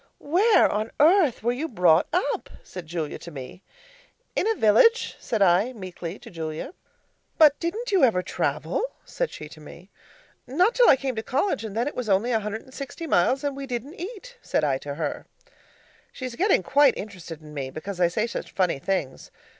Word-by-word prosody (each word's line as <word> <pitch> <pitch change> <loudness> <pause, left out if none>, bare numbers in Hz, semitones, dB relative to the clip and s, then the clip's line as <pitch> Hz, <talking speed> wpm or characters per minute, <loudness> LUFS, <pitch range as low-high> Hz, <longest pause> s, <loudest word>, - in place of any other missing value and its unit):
'Where 385 +9 +4
on 215 +2 -2
earth 315 - +4
were 240 - +2
you 275 +6 -3
brought 180 - +3
up?' 360 +4 -1
said 180 -3 -9
Julia 160 -2 -4
to 170 - -9
me. 140 +3 -9 0.7
'In 405 - +1
a 450 - +2
village,' 430 - +4
said 220 -4 0
I 195 +7 +3
meekly, 185 -4 -7
to - - -13
Julia. 160 - -5 0.6
'But 300 -3 +6
didn't 425 +8 -3
you 380 -7 +3
ever 215 -8 +4
travel?' - - -2 0.2
said - - -2
she 150 - -9
to 155 - -13
me. 180 +5 -13 0.6
'Not 360 - +2
till - - +5
I - - +8
came 265 -1 -3
to - - 0
college, 265 - -1
and 215 -1 -6
then 240 +4 +1
it 290 - -3
was 245 -4 -3
only 200 +6 +2
a 225 - +2
hundred 210 +1 -5
and 260 - -18
sixty 275 +5 -7
miles 265 - +2
and 285 -1 -1
we 275 0 -6
didn't 250 +4 -4
eat,' 480 +5 -8
said - - -1
I 135 -3 +1
to 140 0 -6
her. 160 - -4 0.8
She's 255 -2 -6
getting 375 - +2
quite 285 +6 +4
interested 180 -6 -8
in 150 -1 -13
me, 135 -3 -4
because 180 +7 -7
I 175 - +6
say 215 +6 -1
such 235 - -5
funny 180 -7 +1
things. 155 -5 -3
225 Hz, 195 wpm, -25 LUFS, 175-290 Hz, 0.8 s, I